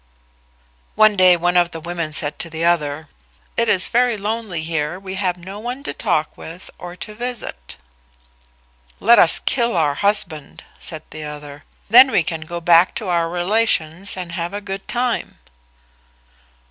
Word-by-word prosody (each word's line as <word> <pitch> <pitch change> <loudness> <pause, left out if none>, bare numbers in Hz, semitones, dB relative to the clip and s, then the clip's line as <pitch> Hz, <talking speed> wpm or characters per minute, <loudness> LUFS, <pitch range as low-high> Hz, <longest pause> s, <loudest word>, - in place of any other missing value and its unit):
One 215 -1 +5
day 185 -2 +5
one 175 +1 0
of 175 -1 +3
the 165 - -8
women 170 -1 -5
said 150 0 -1
to 170 - -3
the 160 +1 -3
other, 155 -3 0 0.5
"It 230 -1 +1
is 185 -2 +3
very 245 -1 +1
lonely 205 -5 -4
here; 160 +1 -2
we 190 -1 -8
have 185 -2 -1
no 190 +4 -9
one 245 +5 -6
to - - -4
talk 165 -7 -1
with 170 +3 -10
or 175 0 -9
to 210 +3 -8
visit." 230 - -6 1.2
"Let 235 +3 +5
us 165 - +6
kill 235 -6 +1
our 150 -3 +2
husband," 160 -4 +2 0.2
said 160 -2 -4
the 155 0 -7
other: 145 -1 -10 0.2
"then 250 +5 +8
we 175 - +2
can 160 0 -4
go 170 +2 -6
back 170 +2 +4
to 210 -5 -3
our 170 -1 0
relations 180 -1 0
and 180 -2 -6
have 170 +2 -4
a - - -3
good 195 -1 -7
time." 245 -1 -2
175 Hz, 165 wpm, -19 LUFS, 160-210 Hz, 1.2 s, then